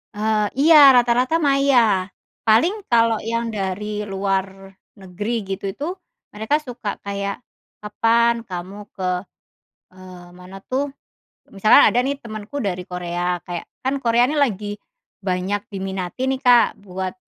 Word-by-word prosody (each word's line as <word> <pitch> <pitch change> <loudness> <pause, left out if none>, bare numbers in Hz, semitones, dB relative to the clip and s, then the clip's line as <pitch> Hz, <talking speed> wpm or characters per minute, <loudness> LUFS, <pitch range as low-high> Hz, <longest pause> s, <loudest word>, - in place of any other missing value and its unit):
Eee, 215 0 +1
iya, 320 +3 +6 0.2
rata-rata 245 +5 +3
maya. 275 -2 +4 0.7
Paling 230 - +4 0.2
kalau 230 -1 +4 0.2
yang 230 0 -1
dari 210 +2 -3
luar 195 0 0 0.5
negeri 190 +3 -6 0.3
gitu 200 - -21
itu, 285 +9 -6 0.5
mereka 220 +7 0
suka 235 -4 -5
kayak, 200 0 -4 0.4
“Kapan 230 +2 +1
kamu 185 +2 -7 0.2
ke 185 -1 -3 0.9
"eee, 185 -1 -12
mana 180 +2 -12
tuh 275 +2 -2 0.6
misalkan 215 +3 +6
ada 245 - +1
nih 280 - -1
temenku 215 +3 -7
dari 185 -4 -3
Korea. 175 -1 -3
Kayak 175 -1 -5 0.2
kan 265 +1 -1
Korea 235 0 +3
ini 300 - -2
lagi 210 -6 -1 0.5
banyak 185 +3 -1
diminati 190 +2 -5
nih, 265 0 -1
Kak, 245 -1 +5
buat 185 -1 -5
210 Hz, 130 wpm, -21 LUFS, 190-235 Hz, 0.9 s, iya